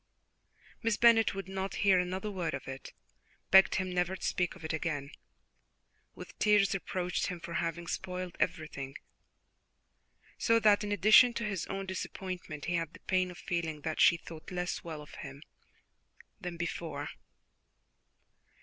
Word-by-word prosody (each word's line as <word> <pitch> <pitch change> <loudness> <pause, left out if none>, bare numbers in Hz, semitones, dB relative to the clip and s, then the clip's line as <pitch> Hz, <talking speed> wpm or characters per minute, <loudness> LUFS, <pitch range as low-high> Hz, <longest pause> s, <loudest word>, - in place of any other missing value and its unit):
Miss 230 -2 +1
Bennet 230 -3 +5
would 195 -1 -5
not 190 0 -3
hear 190 -2 +6
another 185 +3 -2
word 180 -4 -2
of - - -8
it 135 0 -8 0.6
begged 190 0 +7
him 185 -1 -1
never 180 +1 0
to - - -6
speak 180 0 0
of 170 -4 -10
it 160 - -2
again 150 -3 -2 1.0
with - - -11
tears 210 -2 +4
reproached 180 -2 -2
him 180 -1 -4
for 170 - -7
having 170 +1 -2
spoilt 180 0 -4
everything, 140 -4 -2 1.4
so 230 -1 +4
that 210 -1 +5
in 205 - -3
addition 215 +4 +7
to 235 - -2
his 195 -5 -3
own 195 0 -4
disappointment 185 -4 -5
he 175 - -1
had 165 -2 -1
the - - -13
pain 185 -1 +1
of 175 - -10
feeling 165 -3 -3
that 160 +1 -2
she 170 - +7
thought 165 -1 -11
less 180 -1 -3
well 155 -3 -6
of - - -15
him 140 +1 -9 1.0
than 175 -3 -6
before. 160 -3 -4
180 Hz, 155 wpm, -31 LUFS, 165-195 Hz, 1.4 s, begged